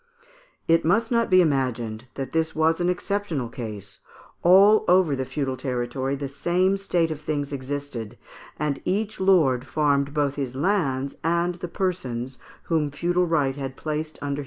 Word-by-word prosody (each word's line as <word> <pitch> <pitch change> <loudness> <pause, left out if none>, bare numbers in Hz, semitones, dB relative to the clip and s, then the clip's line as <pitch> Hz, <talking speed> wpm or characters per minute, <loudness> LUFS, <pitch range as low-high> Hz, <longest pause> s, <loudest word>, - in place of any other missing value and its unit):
It 165 0 +4
must 220 +8 +2
not 235 -1 +2
be 185 -1 +6
imagined 125 -6 -1
that 135 -2 -5
this 160 0 0
was 160 +2 +2
an 175 - +2
exceptional 180 - -2
case; 105 -5 -8 0.4
all 195 +5 +6
over 180 -5 +4
the 130 0 -3
feudal 135 -1 -2
territory 130 +1 -2
the 140 0 -4
same 175 +7 +1
state 175 -4 0
of 155 -1 -5
things 145 -2 -3
existed, 135 -4 -5 0.4
and 150 -2 -2
each 210 +3 -1
lord 155 -10 +3
farmed 140 -2 +1
both 145 -1 0
his 130 -3 -3
lands 140 -5 0
and 170 +2 +1
the 175 - -3
persons 130 -10 -3 0.2
whom 155 -3 0
feudal 175 +5 0
right 145 -5 +1
had 135 -1 -5
placed 155 0 -4
under 145 - -2
his - - -1
dependence. 140 - -2
150 Hz, 165 wpm, -24 LUFS, 135-175 Hz, 0.4 s, be